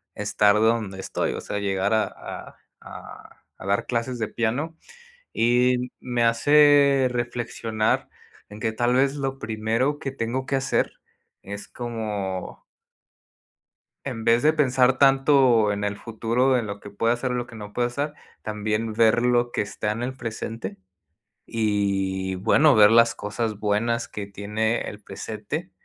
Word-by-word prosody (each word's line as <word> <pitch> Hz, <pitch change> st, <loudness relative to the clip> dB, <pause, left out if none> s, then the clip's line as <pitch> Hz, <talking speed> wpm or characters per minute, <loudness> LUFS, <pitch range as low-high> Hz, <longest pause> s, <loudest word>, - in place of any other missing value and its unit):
estar 105 Hz, 0 st, +2 dB
donde 110 Hz, -3 st, +1 dB
estoy, -, -, -2 dB
o -, -, -5 dB
sea, -, -, -4 dB
llegar 100 Hz, +1 st, 0 dB
a 110 Hz, -, +2 dB
a -, -, -9 dB, 0.2 s
a -, -, -12 dB, 0.2 s
a -, -, -11 dB
dar 100 Hz, +1 st, 0 dB
clases 120 Hz, +1 st, -2 dB
de 110 Hz, -, -1 dB
piano 125 Hz, +10 st, -2 dB, 0.6 s
y 125 Hz, +1 st, +2 dB
me 120 Hz, -2 st, -1 dB
hace 140 Hz, +2 st, +5 dB
reflexionar 120 Hz, -2 st, -2 dB, 0.4 s
en 105 Hz, +1 st, -10 dB
que 110 Hz, -2 st, -1 dB
tal 120 Hz, +2 st, +1 dB
vez 135 Hz, +2 st, +3 dB
lo 135 Hz, -1 st, -3 dB
primero 115 Hz, +6 st, -1 dB
que 135 Hz, -, -4 dB
tengo 130 Hz, +1 st, -3 dB
que 135 Hz, -, 0 dB
hacer 135 Hz, +1 st, 0 dB, 0.5 s
es 100 Hz, +1 st, -8 dB
como 105 Hz, -5 st, -5 dB, 1.4 s
en 120 Hz, -5 st, -5 dB
vez 115 Hz, +4 st, +3 dB
de 155 Hz, -, +5 dB
pensar 130 Hz, -3 st, +3 dB
tanto 135 Hz, -5 st, +4 dB
en 100 Hz, 0 st, -3 dB
el 100 Hz, 0 st, -2 dB
futuro, 120 Hz, +4 st, 0 dB
en 115 Hz, -3 st, -2 dB
lo 100 Hz, 0 st, -6 dB
que 100 Hz, -, -11 dB
pueda 115 Hz, +3 st, +1 dB
hacer, 125 Hz, +1 st, -2 dB
lo 120 Hz, -1 st, -2 dB
que 115 Hz, -, -12 dB
no 105 Hz, -1 st, -9 dB
puede 120 Hz, 0 st, +1 dB
hacer 145 Hz, +4 st, -3 dB, 0.3 s
también 110 Hz, +1 st, -2 dB
ver 115 Hz, +2 st, +3 dB
lo 120 Hz, -1 st, +2 dB
que -, -, -1 dB
está 105 Hz, +1 st, -3 dB
en 115 Hz, +3 st, -4 dB
el 130 Hz, +2 st, -3 dB
presente 110 Hz, -4 st, -6 dB, 0.7 s
y 95 Hz, -3 st, 0 dB
bueno, 140 Hz, +9 st, +4 dB
ver 105 Hz, 0 st, +7 dB
las 115 Hz, 0 st, +5 dB
cosas 105 Hz, +1 st, -3 dB
buenas 110 Hz, +3 st, 0 dB
que 100 Hz, -1 st, -6 dB
tiene 105 Hz, +3 st, -2 dB
el 105 Hz, 0 st, -7 dB
presente. 110 Hz, -, -6 dB
115 Hz, 155 wpm, -24 LUFS, 105-125 Hz, 1.4 s, ver